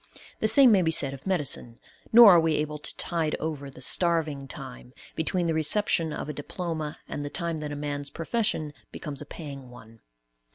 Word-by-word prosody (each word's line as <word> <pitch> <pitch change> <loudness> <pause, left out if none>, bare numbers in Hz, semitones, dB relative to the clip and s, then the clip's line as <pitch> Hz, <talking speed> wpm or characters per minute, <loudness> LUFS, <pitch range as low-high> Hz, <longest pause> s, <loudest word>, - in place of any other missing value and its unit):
The 220 - +1
same 260 +1 +7
may 195 -3 +5
be 165 - +1
said 140 -4 +3
of 135 +6 -11
medicine; 140 -9 -1 0.3
nor 230 -2 +10
are 175 - +7
we 160 -1 +1
able 150 0 -3
to - - -5
tide 165 -3 -1
over 150 -3 -5
the 130 - -13
"starving 155 -2 0
time," 60 - -10 0.2
between 175 +2 -1
the 165 - 0
reception 160 +1 +1
of 150 - -5
a 150 - -4
diploma 155 +1 -5
and 145 - -5
the 145 - -5
time 170 0 -2
that 150 -1 -5
a - - -4
man's 145 -1 -3
profession 165 -3 -2 0.2
becomes 145 -3 -7
a 150 - -9
paying 140 -6 -9
one. 115 -2 -15
155 Hz, 195 wpm, -26 LUFS, 145-170 Hz, 0.3 s, nor